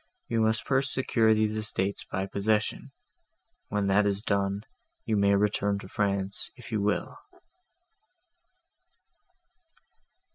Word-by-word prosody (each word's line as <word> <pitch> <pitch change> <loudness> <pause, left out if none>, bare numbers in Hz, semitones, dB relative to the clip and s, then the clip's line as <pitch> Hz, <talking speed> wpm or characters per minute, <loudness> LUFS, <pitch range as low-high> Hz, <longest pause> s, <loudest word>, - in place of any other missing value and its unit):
I - - 0
must 110 0 +2
first 135 +1 +2
secure 115 -4 +2
these 110 0 +1
estates 100 -2 -1
by 95 +1 -3
possession: 105 +2 -1 0.8
when 105 -1 -1
that 100 +1 +3
is 100 +1 -1
done, 100 -1 0 0.4
you 110 - +1
may 100 -1 +4
return 100 0 +1
to 100 - -9
France 100 0 -1
if 120 -3 -12
you 110 -2 0
will." 105 0 -1
105 Hz, 115 wpm, -28 LUFS, 100-110 Hz, 0.8 s, may